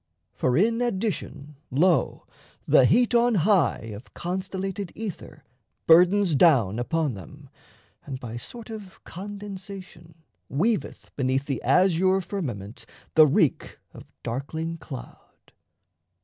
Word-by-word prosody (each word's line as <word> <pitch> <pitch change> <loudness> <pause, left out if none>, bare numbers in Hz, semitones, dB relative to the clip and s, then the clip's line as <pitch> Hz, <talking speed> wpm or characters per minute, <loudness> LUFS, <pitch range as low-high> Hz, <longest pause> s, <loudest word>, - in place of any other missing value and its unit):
For, 125 +1 0
in 230 +6 +2
addition, 190 - -3
lo, 170 +6 +1 0.4
the 130 - +6
heat 240 - +3
on 240 -1 +4
high 185 - +2
Of 105 +5 -12
constellated 190 +1 -4
ether 210 -5 -7 0.4
burdens 180 +2 +5
down 130 - +4
Upon 150 +2 -1
them, 95 -4 -12 0.5
and 135 -3 -6
by 115 -2 -7
sort 230 - -9
of 205 -4 -9
condensation 190 -4 -9 0.3
Weaveth 205 - -1
beneath 135 0 0
the 135 -3 -3
azure 185 +1 +3
firmament 135 - -6 0.3
The 155 -1 +7
reek 140 - +1 0.2
of - - -12 0.2
darkling 160 +7 -4
cloud. 135 -5 -11
170 Hz, 110 wpm, -25 LUFS, 135-200 Hz, 0.5 s, The